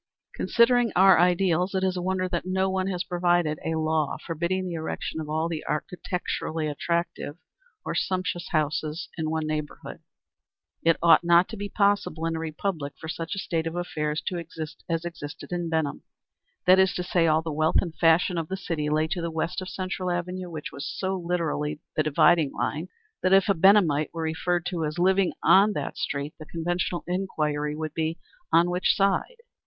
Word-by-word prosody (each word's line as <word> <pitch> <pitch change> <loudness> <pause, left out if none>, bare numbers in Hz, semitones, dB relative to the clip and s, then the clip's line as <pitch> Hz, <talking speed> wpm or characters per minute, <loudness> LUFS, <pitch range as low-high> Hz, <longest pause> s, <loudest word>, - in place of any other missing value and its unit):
Considering 240 -1 +3
our 190 -2 +7
ideals, 180 +1 +2
it 190 - +1
is 185 -1 +1
a 180 - -2
wonder 185 0 0
that 175 -2 -2
no 190 +1 0
one 190 0 0
has 180 -2 -1
provided 175 -4 +1
a 160 - -1
law 155 -2 0
forbidding 170 +3 -1
the 180 - -4
erection 160 0 -4
of 150 - -7
all 160 +2 0
the 165 -2 -4
architecturally 165 -1 -3
attractive, 170 0 -2 0.5
or - - -2
sumptuous 185 -2 -2
houses 155 0 -1
in 160 -2 -2
one 160 0 -1
neighborhood. 155 -1 -5 0.8
It 165 0 +3
ought 170 - +7
not 170 +1 +5
to 225 - -6
be 205 -1 -5
possible 200 -6 +1
in 165 0 -1
a - - -3
republic 160 -2 -3
for 160 - -7
such 165 +2 -4
a - - -8
state 165 -4 -2
of 165 - -4
affairs 155 -3 -2
to 180 - -2
exist 160 -2 -8
as 165 0 -1
existed 165 -2 -7
in 175 -1 -2
Benham. 160 -3 -1 0.6
That 185 +1 +7
is 190 0 +3
to 180 - -2
say 175 -1 +2
all 160 0 +3
the 160 - -3
wealth 155 +2 +2
and 170 -4 -2
fashion 170 +1 +3
of 160 - -4
the 190 - -3
city 165 -5 -2
lay 155 +1 +2
to 175 +1 -2
the 170 - -2
west 165 +3 -2
of 185 - -6
Central 185 0 -3
Avenue, 180 +1 -3
which 155 -3 -6
was 140 - -5
so 190 0 -1
literally 165 -4 -2 0.2
the - - +3
dividing 155 0 +3
line 155 +4 -2 0.3
that 185 - +3
if 195 0 +5
a - - +6
Benhamite 170 -5 +4
were 165 - -2
referred 165 +2 -1
to 180 -2 -2
as 155 +2 -3
living 190 +1 +3
on 200 +2 +6
that - - -4
street 140 +1 -3
the 155 - -9
conventional 175 +2 -2
inquiry 150 -5 -1
would 155 -1 -4
be 160 +1 -1 0.3
"On 170 +2 +4
which 180 +1 +2
side?" 200 - +1
170 Hz, 190 wpm, -26 LUFS, 155-185 Hz, 0.8 s, our